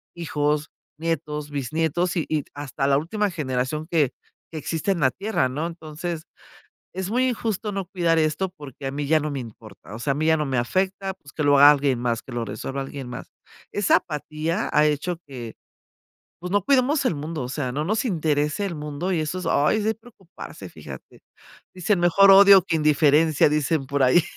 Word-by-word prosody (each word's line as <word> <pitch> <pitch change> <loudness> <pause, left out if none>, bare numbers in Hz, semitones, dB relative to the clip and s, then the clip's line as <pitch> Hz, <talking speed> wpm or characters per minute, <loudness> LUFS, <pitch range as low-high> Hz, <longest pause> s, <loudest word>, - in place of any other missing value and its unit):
hijos, 150 -2 -1 0.3
nietos, 150 -2 -3
bisnietos, 160 +6 -1
y 165 - 0
y 155 -2 0
hasta 145 -1 -3
la 140 - +4
última 205 +8 -1
generación 145 0 -2
que 150 -6 +2 0.4
que 160 - -6
existe 165 +5 -2
en 185 - -1
la 130 -2 +4
tierra, 200 -10 -1
¿no? 150 +6 -3
Entonces, 165 0 -6 0.7
es 190 +1 -4
muy 255 +3 +2
injusto 220 -2 -3
no 195 -2 -3
cuidar 170 -3 +1
esto 155 +4 0
porque 140 -2 -9
a - - -1
mí 145 0 -3
ya 155 +1 +3
no 150 0 -3
me 140 - -3
importa, 110 -5 -12
o - - -6
sea, 130 - -2
a - - -2
mí 155 +2 -1
ya 160 0 +4
no 155 - -1
me 130 -2 -1
afecta, 190 +9 -1
pues, 145 -5 -17
que 150 - -2
lo 145 0 +5
haga 145 +1 +10
alguien 140 -3 0
más, 120 -1 -1
que 130 - -12
lo 120 -1 -2
resuelva 115 +6 -5
alguien 135 -1 -7
más. 125 0 -8 0.4
Esa 205 -1 +3
apatía 155 +3 -3
ha 150 - +4
hecho 150 +4 -1
que, 120 -5 -8 0.9
pues, 180 +1 -6
no 205 -1 +2
cuidemos 275 +3 +2
el 175 - +1
mundo, 150 -1 -5
o 125 - -5
sea, 130 -2 -3
no 150 +4 -2
nos 215 +5 0
interese 155 -1 0
el 185 -4 -4
mundo 150 +4 -4
y 170 - 0
eso 155 +4 -3
es, 180 - -7
ay, 150 +9 +2
es - - -2
de 220 - +2
preocuparse, 215 -6 -12
fíjate. - - -12 0.5
Dicen: 185 +1 +1
"Mejor 195 +3 +6
odio 195 -1 +8
que 165 - -1
indiferencia", 150 0 +4
dicen 150 -1 0
por 140 0 -1
ahí. 130 +7 +5
155 Hz, 200 wpm, -23 LUFS, 145-180 Hz, 0.9 s, haga